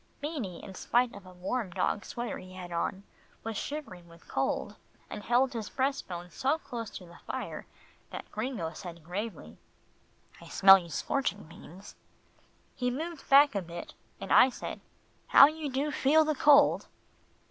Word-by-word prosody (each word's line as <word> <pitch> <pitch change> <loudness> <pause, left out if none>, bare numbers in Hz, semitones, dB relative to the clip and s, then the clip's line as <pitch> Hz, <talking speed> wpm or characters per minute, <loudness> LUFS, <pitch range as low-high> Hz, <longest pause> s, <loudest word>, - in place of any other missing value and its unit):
Beanie, 280 - -5
in 195 - -9
spite 240 +5 +1
of 195 -2 -12
a - - -11
warm 190 +5 -3
dog 195 +3 -1
sweater 240 0 -5
he 185 0 -12
had 180 -1 -8
on, 180 +3 -2 0.4
was 225 -1 -4
shivering 205 - -6
with 170 0 -18
cold - - -2 0.4
and - - -5
held 250 +4 +2
his 225 -3 -4
breast 275 +1 -1
bone 175 -1 -7
so 275 - 0
close 240 -8 -6
to 185 - -9
the 170 0 -15
fire, - - -5 0.4
that - - -8
Gringo 215 -8 -3
said 170 -3 -9
gravely, 175 - -6 0.8
"I - - -12
smell 195 0 +8
you 170 -2 -10
scorching, 205 - -2
Beans." 170 +4 -13 0.8
He 250 -1 -1
moved 315 +5 -6
back 280 0 +7
a 200 - -1
bit, 170 -1 -8 0.3
and 195 - -2
I 260 - +8
said, 250 - -7 0.5
"How - - +9
you 310 0 -2
do 275 +3 -1
feel 305 +3 +4
the 310 - +1
cold." 290 0 +5
220 Hz, 165 wpm, -30 LUFS, 180-275 Hz, 0.8 s, How